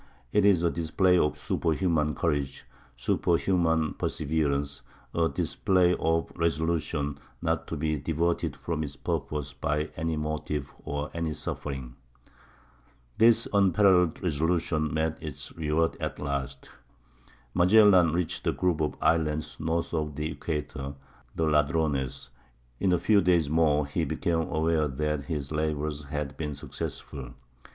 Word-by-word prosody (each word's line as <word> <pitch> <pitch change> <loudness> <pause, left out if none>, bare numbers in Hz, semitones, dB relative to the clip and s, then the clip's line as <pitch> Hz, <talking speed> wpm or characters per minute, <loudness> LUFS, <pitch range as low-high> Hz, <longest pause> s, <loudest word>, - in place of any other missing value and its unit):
It 105 - +4
is 95 -4 +5
a 85 - +3
display 90 +3 +2
of 75 - +1
superhuman 80 -3 0
courage, 70 -5 -1 0.3
superhuman 80 +3 +1
perseverance—a 75 +1 -2
display 90 +5 +2
of 80 0 +1
resolution 80 -3 -1 0.2
not - - -1
to - - -4
be 75 +1 0
diverted 80 +4 -1
from 80 -2 -3
its 70 -2 -5
purpose 70 -1 -3
by 75 +3 -1
any 80 0 -1
motive 75 -2 -3
or 75 +1 -3
any 85 -2 -2
suffering.... 65 -3 -5 1.2
This 115 0 +5
unparalleled 95 -3 +4
resolution 80 -1 0
met 80 0 -1
its 70 -5 -7
reward 80 +1 +1
at - - -3
last. 70 -2 -4 0.8
Magellan 90 -2 +6
reached 85 +1 -2
a - - +4
group 90 -4 0
of 75 -2 0
islands 75 -2 +1
north 80 +2 -1
of 75 -3 -2
the 75 +2 -2
equator—the 70 0 -5
Ladrones. 75 -3 0 0.5
In 95 - +2
a 90 - +4
few 100 +4 +4
days 85 -5 +2
more 75 -2 +3
he 70 - -1
became 80 -1 -1
aware 80 -1 +1
that 75 +1 -2
his 70 -1 -4
labors 75 -1 -2
had 75 -1 -4
been 75 -2 -3
successful. 70 -3 -7
80 Hz, 125 wpm, -28 LUFS, 75-85 Hz, 1.2 s, Magellan